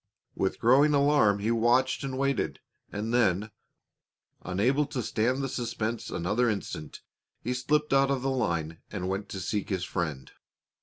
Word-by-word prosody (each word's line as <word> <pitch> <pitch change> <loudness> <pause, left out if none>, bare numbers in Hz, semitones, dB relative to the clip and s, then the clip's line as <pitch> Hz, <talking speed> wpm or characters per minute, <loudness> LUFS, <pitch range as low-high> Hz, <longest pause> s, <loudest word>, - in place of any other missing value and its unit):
With 95 - -1
growing 140 +5 +5
alarm 140 -8 +4
he 100 - -5
had - - 0
watched 120 +5 +2
and 130 -1 -3
waited, 140 0 0 0.3
and 110 +3 -3
then, 105 -3 +2 0.9
unable 125 +11 +1
to 125 - -3
stand 125 +6 0
the - - 0
suspense 115 -3 -3
another 105 +8 +1
instant, 80 -8 -5 0.4
he 125 - -1
slipped 150 +4 0
out 135 0 +4
of 135 -2 0
the 135 - +1
line 85 -10 -1
and 95 -3 -4
went 95 +2 -3
to 95 - -5
seek 100 +3 -2
his 95 -3 -1
friend. 80 -9 -3
115 Hz, 160 wpm, -28 LUFS, 95-135 Hz, 0.9 s, growing